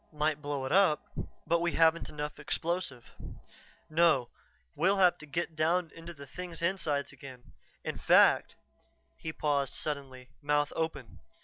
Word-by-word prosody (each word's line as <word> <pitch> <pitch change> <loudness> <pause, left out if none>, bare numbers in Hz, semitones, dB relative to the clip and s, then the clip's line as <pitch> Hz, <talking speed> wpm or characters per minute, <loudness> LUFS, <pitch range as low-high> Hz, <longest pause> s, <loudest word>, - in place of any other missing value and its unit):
Might 150 -1 0
blow 145 -2 -3
it 130 - -4
up, 185 -4 +4 0.4
but 170 +1 +2
we 170 0 0
haven't 165 0 +3
enough 150 0 -5
explosive. 155 -4 -3 0.8
"No, 155 -6 +3 0.5
we'll 190 +5 +2
have 180 -2 +4
to 155 - -10
get 165 +3 -3
down 165 +2 +1
into 165 +1 -9
the 140 -4 -11
thing's 170 +4 -7
insides 155 -6 -1
again. 130 -2 -12 0.3
In - - -4
fact - - +5 0.3
" - - -42
He 160 - -3
paused 145 -3 0
suddenly, 135 -4 -4
mouth 145 0 +1
open. 160 -7 -4
155 Hz, 145 wpm, -31 LUFS, 140-170 Hz, 0.8 s, fact